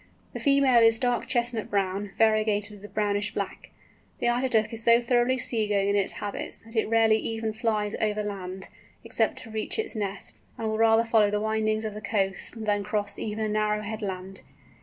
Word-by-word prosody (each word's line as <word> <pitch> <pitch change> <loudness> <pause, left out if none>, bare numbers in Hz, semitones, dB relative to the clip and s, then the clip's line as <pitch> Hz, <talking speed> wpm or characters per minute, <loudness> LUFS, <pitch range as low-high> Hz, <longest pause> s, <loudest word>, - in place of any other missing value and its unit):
The - - -5
female 275 -4 +4
is 225 0 +5
dark 245 +1 0
chestnut 235 -3 -1
brown, 195 0 -1
variegated 215 -1 +2
with 205 -1 -11
brownish 205 0 -1
black. - - -4 0.5
The 240 - +1
Eider 245 +2 +1
Duck 220 -1 +1
is 225 0 -2
so 235 +1 +6
thoroughly 240 +1 +2
sea 225 -4 0
going 200 -1 +1
in 200 - +2
its 200 -1 +1
habits, 205 -1 -5
that 225 +1 -11
it 220 - +2
rarely 225 -1 +4
even 225 -1 -3
flies 215 -2 -1
over 210 -1 0
the - - -3
land, 190 -1 -7 0.3
except - - 0
to 225 - -11
reach 220 0 -3
its 440 - -3
nest, 200 -2 -4 0.2
and 225 - -3
will 220 0 -2
rather 225 0 +5
follow 220 -2 +4
the 210 0 0
windings 220 0 0
of 215 - -3
the 210 - -7
coast 200 +1 -2
than 205 -1 +1
cross 205 -1 -2
even 215 0 -2
a - - 0
narrow 210 0 0
headland. 195 -3 -5
215 Hz, 200 wpm, -27 LUFS, 205-225 Hz, 0.5 s, so